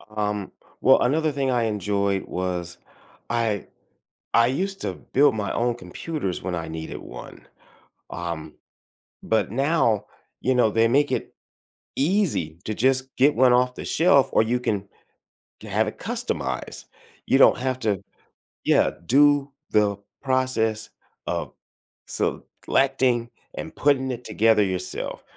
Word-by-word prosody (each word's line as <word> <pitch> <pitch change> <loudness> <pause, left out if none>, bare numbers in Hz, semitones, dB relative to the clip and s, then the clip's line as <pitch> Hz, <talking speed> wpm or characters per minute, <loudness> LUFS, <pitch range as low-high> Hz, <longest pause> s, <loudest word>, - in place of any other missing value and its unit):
Um, 105 -2 -2 0.3
well, - - +6
another 155 +5 +2
thing 135 -2 -1
I 120 -2 +1
enjoyed 100 -2 0
was, 90 -1 -4 0.5
I 115 -4 -1 0.7
I 115 0 +5
used 195 +9 -2
to - - -2
build 145 -3 +2
my 105 -3 -2
own 120 0 0
computers 105 - -5
when 90 -1 -3
I 80 -1 -4
needed 80 0 -6
one. - - -11 0.7
Um, 85 -3 -5 0.7
but 110 -3 0
now, 135 -3 +1 0.4
you 130 - +1
know, 120 -3 +4
they 115 +2 +3
make 140 +5 +3
it - - -3 0.6
easy 145 - 0
to 110 - -3
just 130 +3 +1
get 145 +3 +4
one 130 -2 +5
off 125 +1 +3
the - - -7
shelf 145 -5 +4
or - - +4
you 120 +2 0
can 100 -5 -2 0.7
ge - - -10
have - - 0
it - - -6
customized. - - -4 0.4
You - - +4
don't - - +6
have 130 0 -2
to 105 -5 -1 0.6
yeah, - - +4
do 145 +4 +4 0.2
the 105 -2 +2 0.3
process 120 -5 0 0.4
of - - -2 0.6
selecting 125 -3 0 0.3
and 160 - -7
putting 135 -2 +2
it 125 0 -6
together 110 -1 +3
yourself, 95 -1 -3
115 Hz, 135 wpm, -24 LUFS, 100-135 Hz, 0.7 s, well